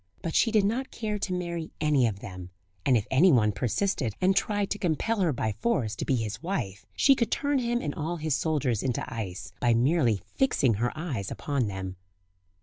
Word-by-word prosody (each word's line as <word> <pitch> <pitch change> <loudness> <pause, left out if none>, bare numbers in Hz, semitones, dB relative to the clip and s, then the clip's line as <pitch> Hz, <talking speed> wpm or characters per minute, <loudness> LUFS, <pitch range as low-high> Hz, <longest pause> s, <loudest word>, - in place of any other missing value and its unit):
But 165 - -2
she 230 - +4
did 215 -3 +4
not 255 +6 -1
care 215 -2 -3
to 195 - -2
marry 170 -2 -3
any 150 -5 +3
of 100 -2 -4
them; 90 -2 -8 0.4
and 130 -3 +5
if 105 - -1
anyone 130 - +5
persisted, 120 - -1
and 190 +1 +3
tried 205 -1 0
to 205 - -1
compel 200 +6 0
her 180 -4 +3
by 110 -4 -1
force 130 - -1
to - - -3
be 135 - +2
his 110 -3 -3
wife, 105 - -3
she 275 - +6
could 235 -4 0
turn 285 -1 +1
him 240 -1 -1
and 145 -2 -2
all 160 +3 -3
his 155 -3 0
soldiers 145 -9 0
into 125 -3 -1
ice, 95 -6 -5
by 120 -2 +3
merely 125 - +3
fixing 150 - +2
her 120 - +1
eyes 135 - -3
upon 140 -6 -1
them. 95 -2 -5
150 Hz, 200 wpm, -28 LUFS, -, 0.4 s, she